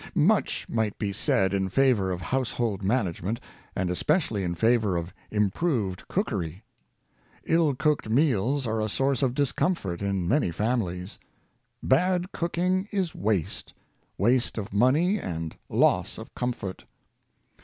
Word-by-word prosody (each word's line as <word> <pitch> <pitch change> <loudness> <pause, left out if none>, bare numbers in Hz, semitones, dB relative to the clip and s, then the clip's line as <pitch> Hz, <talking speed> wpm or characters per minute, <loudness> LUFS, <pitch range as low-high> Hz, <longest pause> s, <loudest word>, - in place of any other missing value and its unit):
Much 190 +6 +2
might 110 -3 -1
be 100 -3 -2
said 95 0 +1
in 95 -1 0
favor 120 -4 +3
of 90 -1 -3
household 120 -4 -1
manage 100 -4 0
ment, 105 +7 -2 0.4
and 90 -1 0
especially 145 - +1
in 85 -1 -2
favor 110 -1 +2
of 85 +2 -4 0.2
improved 105 - 0
cooker}^ 100 - -2 0.8
Ill 160 -4 +3
cooked 150 -4 0
meals 130 +1 +2
are 110 -1 -1
a 110 - -1
source 135 +4 +1
of 130 -2 +1
discomfort 140 - 0
in 100 -3 -1
many 135 - +2
fami 110 +6 0 0.2
lies. 95 +3 -10 0.6
Bad 180 +6 +2
cooking 180 +3 0
is 190 -5 -1
waste 100 -6 -2 0.2
— - - -43
waste 120 +6 +2
of 100 -2 -5
money 150 - +3
and 80 - -4
loss - - +2
of - - -10
comfort. 120 -6 -4
115 Hz, 140 wpm, -27 LUFS, 95-145 Hz, 0.8 s, favor